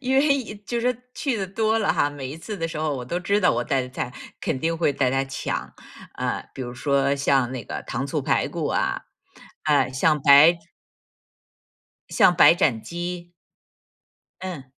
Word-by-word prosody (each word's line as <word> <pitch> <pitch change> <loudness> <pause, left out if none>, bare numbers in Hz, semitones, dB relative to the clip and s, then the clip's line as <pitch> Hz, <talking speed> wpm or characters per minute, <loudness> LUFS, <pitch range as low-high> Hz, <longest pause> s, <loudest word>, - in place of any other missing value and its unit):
因 265 0 0
为， 275 -7 +1
就 235 -1 -2
是 250 0 0 0.2
去 270 -5 -1
的 195 -3 -3
多 220 +3 0
了 210 - +1
哈， 145 - +2
每 135 -3 -7
一 140 - -6
次 200 +6 -7
的 165 -2 -2
时 165 - -6
候 155 -3 -1
我 125 - -6
都 175 +8 -3
知 200 +3 +1
道 180 - +4
我 120 +1 0
带 135 -2 0
的 125 - -7
菜 125 - -4 0.3
肯 - - -2
定 165 +4 -1
会 160 -3 +2
大 130 -2 +1
家 135 0 +1
抢， 135 0 -4 0.4
啊 - - -2
比 130 - -5
如 120 - -6
说 140 +1 +1
像 135 -3 +1
那 130 - -5
个 - - -6
糖 135 +4 -4
醋 145 +1 -2
排 - - +1
骨 - - -3
啊， - - -1 0.6
呃， 140 -4 +2
像 150 +3 +2
白 150 +4 +7 1.5
像 175 - +4
白 165 - +7
斩 135 - +1
鸡。 175 0 -6 1.1
嗯 180 -7 -6
155 Hz, 200 characters per minute, -24 LUFS, 135-185 Hz, 1.5 s, 白